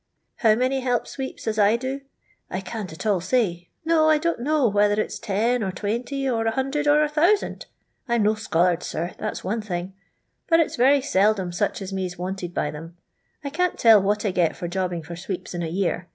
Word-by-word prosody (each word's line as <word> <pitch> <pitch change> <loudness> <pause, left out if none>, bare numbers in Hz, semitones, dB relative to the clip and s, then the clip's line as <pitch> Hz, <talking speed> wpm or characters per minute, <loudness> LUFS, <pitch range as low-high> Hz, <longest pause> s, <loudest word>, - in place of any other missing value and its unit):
How 220 -2 +4
many 255 +3 +1
help 250 -2 0
sweeps 265 -1 -7
as 215 -1 0
I 205 +2 +5
do 260 +3 -3 0.5
1 - - -4
I - - -3
can't 200 -1 -6
at 160 - -8
all 200 -5 +2
say. 185 -4 0 0.2
No, 320 -1 +4
I 310 - +5
don't' 335 -1 -1
know 290 +1 +2
whether 205 0 +2
it's - - -2
10, 225 +5 0
or 195 -3 -1
20, 240 +8 -3
or 230 -3 0
100, 270 +6 -1
or 295 0 +5
1000. 315 +7 +1 0.4
I 235 - +1
'm 230 - +2
no 210 +1 +3
scholard, 180 -5 +1
sir, 170 +3 -4
that's 215 - -4
one 215 +4 -2
thing. 185 -2 -4 0.5
But 330 -2 +4
it 330 - +2
's - - -5
very 270 +3 +4
seldom 200 -7 +2
such 200 +2 -1
as 195 0 -6
me 190 -1 -2
's 180 - -11
wanted 180 0 -4
by 150 - -1
them. 165 +3 -10 0.5
I 280 - -4
can't 360 +4 0
tell 225 -3 +7
what 205 +2 0
I 200 - +1
get 170 -4 +1
for 175 - -5
jobbing 175 -2 -2
for 170 +3 -8
sweeps 185 +1 -6
in 175 - -3
a 165 - -2
year. 175 0 -1
210 Hz, 220 wpm, -24 LUFS, 185-260 Hz, 0.5 s, tell